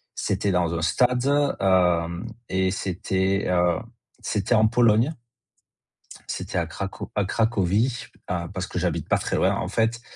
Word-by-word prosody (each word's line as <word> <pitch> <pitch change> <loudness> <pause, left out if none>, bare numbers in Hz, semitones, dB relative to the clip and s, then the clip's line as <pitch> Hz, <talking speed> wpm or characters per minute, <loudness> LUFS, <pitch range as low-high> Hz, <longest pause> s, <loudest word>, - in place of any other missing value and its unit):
c'était 100 - -1
dans 90 -2 +1
un 80 - -2
stade, 125 +8 +2
heu 95 -11 +2 0.2
et 95 0 +1
c'était, 95 +1 -1
heu, 90 -2 +2 0.4
c'était 105 +4 0
en 110 0 +5
Pologne 115 +5 +3 1.2
c'était - - -4
à 85 - +1
craco 90 +4 -6
à 105 -2 +1
Cracovie, 110 +3 +1 0.2
à 85 -1 -2
parce 95 -1 -3
que - - -4
j'habite 85 -3 -1
pas - - +4
très - - -2
loin, - - +2
en - - -3
fait 115 +1 0
95 Hz, 150 wpm, -24 LUFS, 90-115 Hz, 1.2 s, en